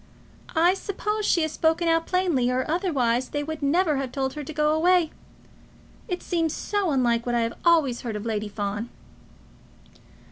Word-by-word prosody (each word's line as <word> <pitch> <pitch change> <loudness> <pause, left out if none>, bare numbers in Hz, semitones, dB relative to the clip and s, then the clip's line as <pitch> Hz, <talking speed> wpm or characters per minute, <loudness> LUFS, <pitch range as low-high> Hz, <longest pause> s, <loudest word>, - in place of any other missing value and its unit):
"I 340 +3 +5
suppose 420 +2 -3
she 335 - +3
has 315 - -1
spoken 325 +2 +1
out 330 0 +2
plainly, 345 -10 +1
or 255 +1 0
otherwise 265 -8 0
they 290 0 -2
would 315 0 -5
never 305 +1 +2
have 270 -2 -3
told 265 -1 -2
her 300 - -6
to 285 - -7
go 300 0 +1
away. 345 0 +3 1.0
It 360 -1 -4
seems 330 -3 -1
so 405 -3 -1
unlike 240 -4 +1
what 240 - 0
I 235 - +2
have 230 0 -1
always 315 -8 +3
heard 230 -3 -4
of 210 +1 -5
Lady 215 -2 -2
Fawn." 205 +2 -4
300 Hz, 175 wpm, -25 LUFS, 245-340 Hz, 1.0 s, I